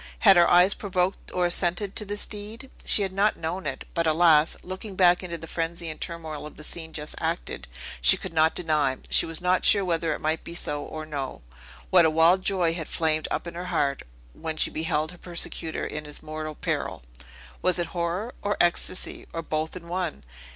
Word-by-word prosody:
Had 195 -3 +8
her 175 -1 +6
eyes 180 +3 +6
provoked 185 -2 -2
or 180 -1 +1
assented 180 +3 +1
to 210 - -1
this 205 +1 -2
deed? 215 +5 -8
She 205 - +5
had 190 -1 -3
not 205 +2 +2
known 170 +4 -3
it. - - -4
But, 170 -1 +1
alas! 160 -1 +5
looking 190 +2 -7
back 180 -1 +5
into 175 -2 -5
the 165 - -9
frenzy 165 +1 -3
and 155 - -11
turmoil 160 -3 -4
of - - -14
the 150 - -10
scene 160 0 -7
just 150 -1 -5
acted, - - -3 0.3
she - - +7
could 185 - -7
not 160 0 +3
deny 150 -6 +1
she - - +4
was 165 0 -5
not 180 +1 +2
sure 200 -2 +6
whether 165 -2 0
it - - -8
might 155 +1 -1
be 170 - -8
so, 145 -3 -3
or 155 +1 -6
no 140 - -5 0.5
that 180 -2 +8
a 160 - +5
wild 165 +4 +4
joy 185 -4 +1
had 165 -2 -5
flamed 155 -1 0
up - - -2
in 170 - -6
her 175 +1 -5
heart, 145 -6 0 0.3
when 160 - -5
she - - +2
beheld 160 0 -1
her 180 - -14
persecutor 170 -2 -2
in 150 0 -5
his 150 0 -6
mortal 155 0 -5
peril. - - -3 0.6
Was 185 -1 +2
it 175 - 0
horror? 175 +7 -2
or 205 0 -1
ecstasy? 175 +1 +1
or 165 - -3
both 155 +1 -2
in 170 -2 -9
one? 175 -2 -3
170 Hz, 205 wpm, -26 LUFS, 155-185 Hz, 0.6 s, Had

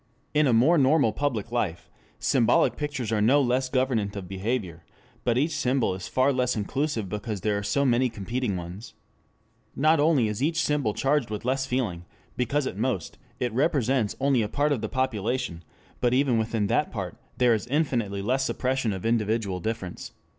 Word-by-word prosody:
In 150 -1 +4
a - - +3
more 135 +9 +5
normal 135 -4 +4
public 120 -5 -2
life, 90 -9 -2 0.3
symbolic - - +3
pictures 145 -6 -3
are 110 -2 +1
no 130 +7 +5
less 130 -1 +1
governant 130 -6 0
of 95 -3 -6
behavior, 95 -3 -3 0.4
but 120 -1 +1
each 150 +5 +1
symbol 125 -6 +1
is 95 0 -6
far 130 +2 +2
less 125 -1 +1
inclusive 115 +1 -2
because 105 +1 -4
there 105 +1 0
are 100 - -1
so 140 +7 0
many 125 0 +3
competing 115 0 -3
ones. 90 +5 -8 0.8
Not 155 +4 +3
only 145 -6 +3
is 105 +2 -3
each 160 +3 +1
symbol 145 -8 0
charged 135 -3 +1
with 105 +1 -5
less 135 +1 0
feeling 105 -10 -2 0.3
because 140 +3 0
at 95 - -4
most 115 - -2 0.2
it 125 -3 -1
represents 130 -4 +1
only 135 -2 +2
a 105 - -2
part 145 +1 +1
of 135 -6 0
the 110 - -3
population, 125 -7 -2 0.4
but 125 0 +2
even 130 -4 +2
within 110 -1 0
that - - +1
part - - -5 0.2
there 125 -2 +4
is 110 +1 -2
infinitely 120 -9 0
less 130 +5 +1
suppression 130 -4 -1
of 95 +1 -6
individual 110 -4 0
difference. 95 -2 -5
120 Hz, 180 wpm, -26 LUFS, 105-135 Hz, 0.8 s, more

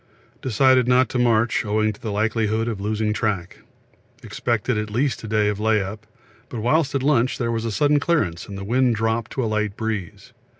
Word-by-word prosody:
We - - -34
decided 130 +2 +4
not 125 +1 +4
to 125 - -2
march 120 -1 +2
owing 110 0 0
to 110 +2 -7
likelihood 110 +1 0
of 110 -4 -3
losing 105 +1 -1
track; 100 -6 -2 0.6
expected 120 0 -1
at 105 0 -2
least 125 +5 -1
a - - -6
day 105 -1 +1
of 105 -1 -1
lay 110 0 +2
up, 105 +3 -6 0.4
but 120 - -5
whilst 145 +4 +1
at 135 - 0
lunch 130 -3 +2
there 120 -2 -1
was 115 0 -2
a 115 - -2
sudden 145 +6 +2
clearance 145 - -1
and 100 -1 -7
wind 125 +2 +2
dropped 115 +1 -1
to 130 - -1
light 110 -2 -1
breeze. 110 -5 -5
110 Hz, 195 wpm, -22 LUFS, 105-125 Hz, 0.6 s, decided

